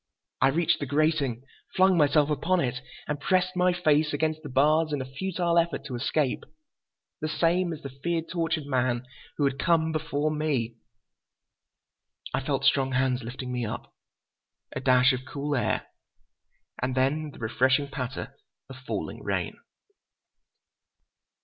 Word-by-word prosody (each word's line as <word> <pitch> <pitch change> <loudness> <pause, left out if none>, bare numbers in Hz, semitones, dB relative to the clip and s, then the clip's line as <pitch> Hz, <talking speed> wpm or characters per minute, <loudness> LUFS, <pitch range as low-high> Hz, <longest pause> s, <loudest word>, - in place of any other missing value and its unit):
I - - +6
reached 160 +5 +2
the 145 - -3
grating, 145 -4 +1 0.3
flung 190 0 +5
myself 150 -1 +4
upon 175 +6 +1
it 125 -4 -1 0.3
and 150 -1 -2
pressed 185 +4 +1
my 180 0 +3
face 155 -4 +2
against 155 +1 0
the 150 - -8
bars 155 +4 +3
in 145 - -1
a 130 - -3
futile 170 +5 0
effort 170 -4 -1
to 130 -3 -5
escape. 135 +2 0 0.8
The 155 - -2
same—as 165 0 0
the 140 - -6
fear 165 +5 -2
tortured 165 -3 -2
man—who 130 +1 -2
had—come 160 +4 +2
before—me. 150 -5 -1 1.6
I - - +1
felt 135 0 -1
strong 135 -1 +3
hands 130 0 +1
lifting 125 +2 -6
me 125 -1 -2
up. 105 - -5 0.8
A - - -1
dash 125 0 +5
of 130 0 -3
cool 145 +1 -3
air, 125 - 0 1.0
and 130 0 -1
then 145 +4 +1
the - - -13
refreshing 130 +5 +2
patter 135 -2 -5 0.4
of 130 - -9
falling 130 - -5
rain. - - -2
145 Hz, 135 wpm, -27 LUFS, 130-160 Hz, 1.6 s, I